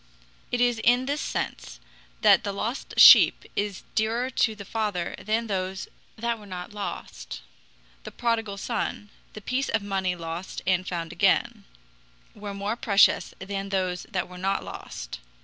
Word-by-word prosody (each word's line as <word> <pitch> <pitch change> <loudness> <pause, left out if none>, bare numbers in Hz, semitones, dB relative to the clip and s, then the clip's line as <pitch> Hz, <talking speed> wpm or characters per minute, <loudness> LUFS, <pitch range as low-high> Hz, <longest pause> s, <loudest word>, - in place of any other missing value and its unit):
It 245 - 0
is 245 -1 +2
in 245 +2 +4
this 285 +2 -1
sense - - -4 0.4
that - - +6
the 200 - -2
lost 225 +6 -4
sheep - - +9
is 205 -2 -2
dearer 230 +4 0
to 220 -3 +1
the 200 -1 -9
Father 205 -5 -2
than 220 +2 -1
those 190 -2 -3 0.3
that 235 0 -2
were 205 - -13
not 180 +1 -7
lost. 205 -1 -6 0.6
The - - -7
prodigal 225 -4 -1
son, 205 -1 -3 0.2
the 215 - -9
piece 255 +6 -1
of 220 -2 0
money 190 -2 -1
lost 170 +2 -6
and 185 0 +1
found 170 -2 -4
again, 175 - +2 0.7
were 205 -1 -7
more 200 +3 -2
precious 200 -4 +3
than 195 +1 -5
those 185 -2 -2
that 185 -5 -2
were 180 0 -11
not 195 +1 0
lost. - - -8
200 Hz, 155 wpm, -26 LUFS, 185-225 Hz, 0.7 s, sheep